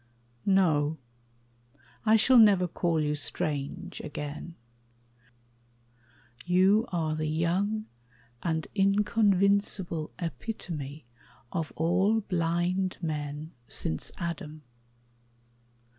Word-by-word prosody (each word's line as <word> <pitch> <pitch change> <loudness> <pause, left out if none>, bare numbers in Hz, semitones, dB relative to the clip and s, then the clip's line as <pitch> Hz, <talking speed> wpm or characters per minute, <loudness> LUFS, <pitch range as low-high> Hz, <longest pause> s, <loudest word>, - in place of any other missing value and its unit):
No, 160 -6 +3 1.1
I 220 - +7
shall 245 +3 +6
never 200 -5 +6
call 170 -1 0
you 150 -1 0
strange 150 +4 -2
again: 150 +2 -6 1.9
You 190 +5 +4
are 160 -3 0
the 155 0 -2
young 185 +7 0 0.6
and 160 -2 -1
inconvincible 200 -4 +2
Epitome 160 - -5 0.5
of 165 -3 -3
all 190 +7 +2
blind 180 0 0
men 150 0 -4 0.2
since 80 0 -2
Adam. 155 -3 -5
170 Hz, 80 wpm, -28 LUFS, 155-195 Hz, 1.9 s, I